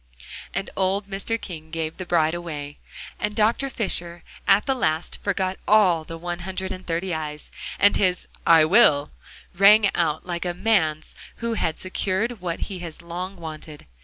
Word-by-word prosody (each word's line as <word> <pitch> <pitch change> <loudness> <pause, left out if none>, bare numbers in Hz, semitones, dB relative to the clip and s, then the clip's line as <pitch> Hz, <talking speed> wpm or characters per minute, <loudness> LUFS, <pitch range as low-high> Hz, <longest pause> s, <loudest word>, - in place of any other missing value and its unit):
And 195 +1 -2
old 195 +2 0
Mr. 200 +3 -2
King 160 -5 -8
gave 160 -1 -4
the 185 - -6
bride 160 -2 +2
away! 150 -4 -6 0.4
And 210 0 -1
Dr. 230 +5 +2
Fisher 175 -8 -3 0.2
at 195 +1 +5
the 270 - +2
last 160 -10 -1
forgot 190 -1 -1
all 190 -6 +5
the 165 +1 -8
one 175 +1 -4
hundred 190 +1 -4
and 185 0 -6
thirty 175 +2 -1
eyes, 150 -1 -5 0.3
and 205 - +5
his 180 -3 +1 0.2
"I 165 -2 +6
will," 155 -6 +5 0.4
rang 200 +3 +6
out 160 -2 0
like 175 -1 -3
a 175 -1 -2
man's 180 -6 +1 0.2
who 235 0 -2
has 160 -7 -1
secured 190 +4 -2
what 170 -2 -3
he 190 -2 -4
has 170 -1 -8
long 180 +3 -5
wanted. 155 -3 -9
180 Hz, 165 wpm, -24 LUFS, 165-200 Hz, 0.4 s, I